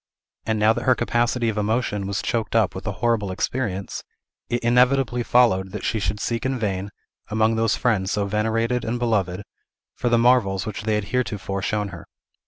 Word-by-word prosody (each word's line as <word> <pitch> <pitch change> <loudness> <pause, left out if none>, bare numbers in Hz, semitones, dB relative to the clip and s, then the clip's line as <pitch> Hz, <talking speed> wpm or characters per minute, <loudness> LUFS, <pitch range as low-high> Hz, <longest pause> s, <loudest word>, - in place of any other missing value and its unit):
And 110 -1 +1
now 105 +1 +4
that - - -4
her 130 - +5
capacity 120 0 0
of 110 -1 -1
emotion 105 -2 -1
was 100 0 -2
choked 115 -2 -2
up 110 -4 +3
with 95 +3 -7
a - - 0
horrible 115 -4 +1
experience, 100 -1 -3 0.5
it 120 0 -1
inevitably 125 +1 +3
followed 110 -6 +3
that 105 - -5
she 110 - 0
should 105 +1 -2
seek 115 +2 -2
in 130 0 -1
vain, 100 -3 -2 0.4
among 110 +1 +2
those 110 -1 +2
friends 105 -6 +1
so 105 -1 0
venerated 110 +4 0
and 115 +2 -2
beloved, 105 -6 0 0.5
for 120 - -1
the 120 - +4
marvels 115 -6 +3
which 105 -1 -5
they 110 -1 +1
had 105 -1 -3
heretofore 105 -6 -1
shown 105 0 -1
her. 85 -2 -10
110 Hz, 190 wpm, -23 LUFS, 100-120 Hz, 0.5 s, her